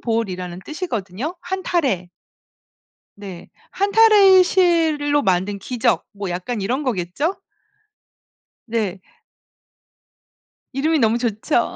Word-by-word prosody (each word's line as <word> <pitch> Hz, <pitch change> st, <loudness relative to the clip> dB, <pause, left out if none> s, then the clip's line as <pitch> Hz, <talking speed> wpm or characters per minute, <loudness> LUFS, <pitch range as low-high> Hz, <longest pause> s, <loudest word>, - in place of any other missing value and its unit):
볼이라는 185 Hz, -6 st, -3 dB
뜻이거든요. 270 Hz, -, -4 dB
한 375 Hz, +2 st, -4 dB
타래. 255 Hz, -, 0 dB, 1.1 s
네. 195 Hz, -4 st, -10 dB, 0.2 s
한 400 Hz, +1 st, -1 dB
타래의 405 Hz, -4 st, +7 dB
실로 325 Hz, -6 st, +2 dB
만든 190 Hz, -1 st, 0 dB
기적 230 Hz, +4 st, -1 dB
뭐 200 Hz, -2 st, -6 dB
약간 185 Hz, +7 st, -4 dB
이런 250 Hz, +9 st, -1 dB
거겠죠? 250 Hz, -, -2 dB, 1.3 s
네. 215 Hz, -5 st, -2 dB, 1.7 s
이름이 305 Hz, +4 st, +1 dB
너무 225 Hz, -1 st, +3 dB
좋죠. 235 Hz, +2 st, -1 dB
240 Hz, 200 characters per minute, -20 LUFS, 200-325 Hz, 1.7 s, 타래의